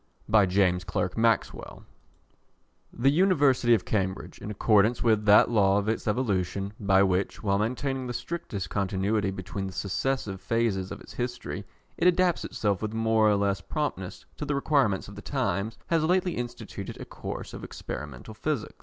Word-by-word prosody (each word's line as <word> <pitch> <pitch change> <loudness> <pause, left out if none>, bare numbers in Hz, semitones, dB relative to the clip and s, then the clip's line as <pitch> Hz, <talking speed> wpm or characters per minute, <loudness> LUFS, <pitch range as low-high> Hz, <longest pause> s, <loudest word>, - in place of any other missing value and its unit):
James 90 -1 +2
Clerk 90 +1 -2
Maxwell 115 -1 0 1.1
The 135 +4 +2
University 145 -9 +4
of 100 - -3
Cambridge, 95 -3 -2
in - - -7
accordance 105 +2 +3
with 110 -3 +3
that 105 +2 +6
law 100 -3 +4
of 100 +1 -1
its 110 +1 -1
evolution, 100 -4 -1
by 95 -1 +4
which, 95 +2 0
while 100 -1 +2
maintaining 130 +4 -2
the 120 - -4
strictest 105 - -5
continuity 100 +1 0
between 95 +1 -5
the 95 - -7
successive 100 0 -2
phases 110 -5 0
of - - -7
its - - -12
history, 120 0 -4 0.3
it 170 - +4
adapts 180 -1 +3
itself 100 -3 -1
with 110 0 -3
more 110 -1 +3
or 105 - +4
less 100 -1 0
promptness 95 - -4
to - - -5
the 145 0 -1
requirements 140 -9 +1
of 100 - -10
the 105 - -8
times, 115 -5 -2
has 165 -2 +1
lately 180 +2 +2
instituted 120 0 -6
a - - -6
course - - -7
of - - -8
Experimental 70 - -7
Physics. 145 +1 -3
105 Hz, 165 wpm, -27 LUFS, 95-125 Hz, 1.1 s, that